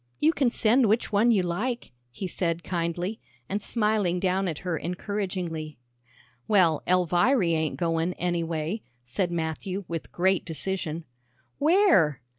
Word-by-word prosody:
"You 315 Hz, +2 st, +3 dB
can 270 Hz, -6 st, +2 dB
send 235 Hz, +1 st, +3 dB
which 220 Hz, +2 st, +1 dB
one 215 Hz, +3 st, +4 dB
you 205 Hz, -6 st, +4 dB
like," 215 Hz, +8 st, -2 dB, 0.2 s
he 155 Hz, +10 st, -6 dB
said 170 Hz, -2 st, -2 dB
kindly, 175 Hz, +4 st, -2 dB, 0.3 s
and 205 Hz, +2 st, -2 dB
smiling 210 Hz, -6 st, +1 dB
down 190 Hz, +1 st, +1 dB
at 160 Hz, -4 st, -2 dB
her 175 Hz, -2 st, 0 dB
encouragingly. 180 Hz, -4 st, -4 dB, 0.7 s
"Well, 175 Hz, -7 st, +4 dB
Elviry 180 Hz, -, +3 dB
ain't 160 Hz, -1 st, -1 dB
goin', 165 Hz, 0 st, 0 dB
anyway," 170 Hz, +2 st, -2 dB, 0.2 s
said 175 Hz, +9 st, -2 dB
Matthew, 170 Hz, +4 st, -3 dB
with 165 Hz, -2 st, -5 dB
great 190 Hz, +1 st, +2 dB
decision. 165 Hz, -1 st, -3 dB, 0.5 s
"Where?" 310 Hz, -, +4 dB
180 Hz, 130 wpm, -27 LUFS, 165-210 Hz, 0.7 s, one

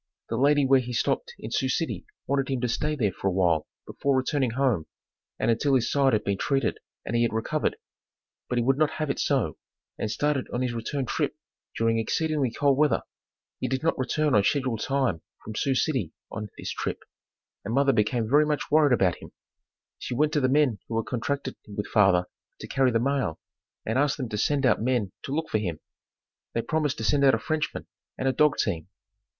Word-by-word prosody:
The 115 Hz, -, -1 dB
lady 140 Hz, +3 st, +4 dB
where 135 Hz, 0 st, +5 dB
he 125 Hz, -1 st, -5 dB
stopped 475 Hz, -, -1 dB
in -, -, -8 dB
Sioux -, -, 0 dB
City -, -, -2 dB, 0.2 s
wanted 140 Hz, -1 st, 0 dB
him 135 Hz, -2 st, 0 dB
to 125 Hz, -, +1 dB
stay 150 Hz, +6 st, -1 dB
there 110 Hz, -9 st, +1 dB
for 95 Hz, -, -4 dB
a -, -, +2 dB
while 85 Hz, -4 st, +2 dB, 0.2 s
before 140 Hz, -1 st, 0 dB
returning 130 Hz, 0 st, +1 dB
home, 115 Hz, -, 0 dB, 0.5 s
and -, -, +2 dB
until 135 Hz, +4 st, +2 dB
his 120 Hz, -2 st, +1 dB
side 135 Hz, -3 st, +3 dB
had 110 Hz, -, +2 dB
been 100 Hz, -1 st, -1 dB
treated 135 Hz, -4 st, 0 dB, 0.3 s
and 115 Hz, -, -2 dB
he 120 Hz, -, +3 dB
had 120 Hz, -, +2 dB
recovered, 115 Hz, +7 st, -1 dB, 0.7 s
but 125 Hz, -, -1 dB
he 120 Hz, -, +2 dB
would 135 Hz, +3 st, +2 dB
not 155 Hz, -1 st, +2 dB
have 155 Hz, -2 st, -1 dB
it -, -, -4 dB
so, 130 Hz, -, 0 dB, 0.4 s
and 110 Hz, -, -1 dB
started 140 Hz, +5 st, 0 dB
on 125 Hz, -, -1 dB
his 125 Hz, -2 st, -1 dB
return 130 Hz, +4 st, -3 dB
trip -, -, -1 dB, 0.4 s
during 115 Hz, 0 st, +2 dB
exceedingly 150 Hz, +3 st, 0 dB
cold 140 Hz, +3 st, +2 dB
weather. 150 Hz, -5 st, +3 dB, 0.6 s
He 130 Hz, -, -1 dB
did 130 Hz, +3 st, -2 dB
not 165 Hz, -, +2 dB
return 145 Hz, +3 st, 0 dB
on 105 Hz, -, +5 dB
schedule 130 Hz, +1 st, +1 dB
time 130 Hz, -, 0 dB, 0.2 s
from 110 Hz, -, -7 dB
Sioux 135 Hz, +5 st, 0 dB
City 130 Hz, -, 0 dB, 0.2 s
on 105 Hz, 0 st, -5 dB
this -, -, -5 dB
trip, -, -, -4 dB, 0.6 s
and 100 Hz, -, -4 dB
mother 135 Hz, +2 st, +3 dB
became 110 Hz, +1 st, +1 dB
very 150 Hz, +5 st, +4 dB
much 150 Hz, -1 st, -2 dB
worried 150 Hz, -3 st, +5 dB
about 95 Hz, -7 st, +2 dB
him. -, -, -13 dB, 0.7 s
She 125 Hz, -, -4 dB
went 150 Hz, +4 st, +2 dB
to 150 Hz, -, +2 dB
the 130 Hz, -, +2 dB
men 135 Hz, -6 st, +3 dB
who 115 Hz, -, -2 dB
had 115 Hz, -, 0 dB
contracted 130 Hz, +2 st, -3 dB
with 105 Hz, 0 st, -4 dB
father 95 Hz, -4 st, +4 dB, 0.3 s
to -, -, -7 dB
carry 130 Hz, -1 st, +2 dB
the 115 Hz, -2 st, +2 dB
mail 135 Hz, -, 0 dB, 0.5 s
and 115 Hz, +4 st, 0 dB
asked 145 Hz, 0 st, +2 dB
them 130 Hz, -5 st, -4 dB
to 105 Hz, -, -3 dB
send 145 Hz, +2 st, +1 dB
out 125 Hz, -, +3 dB
men 120 Hz, -5 st, 0 dB
to -, -, -6 dB
look 160 Hz, +3 st, -1 dB
for 110 Hz, -, +1 dB
him. 85 Hz, -7 st, -3 dB, 0.8 s
They 115 Hz, -, 0 dB
promised 155 Hz, -3 st, 0 dB
to 110 Hz, -, -4 dB
send 140 Hz, +6 st, +2 dB
out 135 Hz, -1 st, +6 dB
a -, -, 0 dB
Frenchman, 155 Hz, -1 st, -2 dB, 0.3 s
and 130 Hz, -, -1 dB
a 130 Hz, -, +2 dB
dog 150 Hz, +2 st, +3 dB
team. 85 Hz, -6 st, -1 dB
130 Hz, 210 wpm, -26 LUFS, 110-140 Hz, 0.8 s, out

